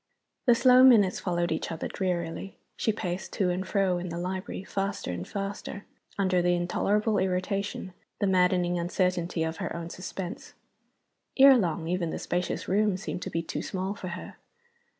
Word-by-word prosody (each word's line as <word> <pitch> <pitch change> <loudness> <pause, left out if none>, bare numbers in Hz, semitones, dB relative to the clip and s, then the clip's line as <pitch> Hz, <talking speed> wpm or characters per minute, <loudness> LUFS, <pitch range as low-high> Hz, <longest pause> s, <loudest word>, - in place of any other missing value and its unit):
The 240 - +7
slow 255 +1 +6
minutes 220 -8 +6
followed 175 -2 -1
each 160 - -2
other 165 - -3
drearily. 180 0 -3 0.2
She 220 - +1
paced 185 -3 -4
to 185 -3 +1
and 185 +1 -3
fro 190 -3 +1
in 180 0 -5
the 170 - -5
library, 185 +2 -4
faster 195 - -3
and 90 0 -5
faster, 200 0 -5 0.3
under 185 -2 +2
the 175 0 +3
intolerable 205 +5 +1
irritation, 185 +1 -2 0.3
the - - +1
maddening 180 -2 +2
uncertainty, 175 -1 0
of 160 0 -3
her - - -4
own 170 0 -5
suspense. 185 0 -7 0.8
Ere 270 0 +9
long, 170 -7 0
even 175 -1 -1
the - - -3
spacious 175 0 -2
room 205 0 +2
seemed 185 -1 -5
to - - -4
be 165 - -2
too - - -4
small 190 0 -3
for 200 -3 -7
her. 175 +1 -7
185 Hz, 170 wpm, -28 LUFS, 175-200 Hz, 0.8 s, Ere